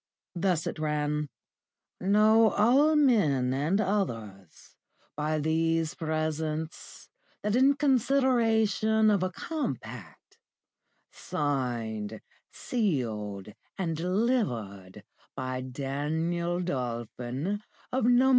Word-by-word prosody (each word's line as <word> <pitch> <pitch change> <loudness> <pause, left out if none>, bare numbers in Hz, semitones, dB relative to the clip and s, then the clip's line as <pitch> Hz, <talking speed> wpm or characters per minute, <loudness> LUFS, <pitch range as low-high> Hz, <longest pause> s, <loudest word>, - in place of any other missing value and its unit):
Thus 175 -2 0
it - - -4
ran: 150 -1 -1 0.7
"Know 215 +3 +5
all 270 +10 +4
men, 160 - +3
and 150 +9 +1
others, 115 - -3 0.4
by 155 +1 -1
these 160 +1 +1
presents 155 0 -3 0.4
that 210 +1 +1
in 270 +3 +5
consideration 225 -6 +3
of 200 -3 +2
a 185 - 0
compact, 130 - -6 0.7
signed, 115 -7 -3 0.3
sealed, 110 - -2 0.3
and 170 -4 -1
delivered 160 - -1 0.3
by 130 0 -3
Daniel 155 +7 -2
Dolphin, 125 - -3 0.3
of 255 -2 +1
No. 245 +2 +5
160 Hz, 85 wpm, -28 LUFS, 130-215 Hz, 0.7 s, Know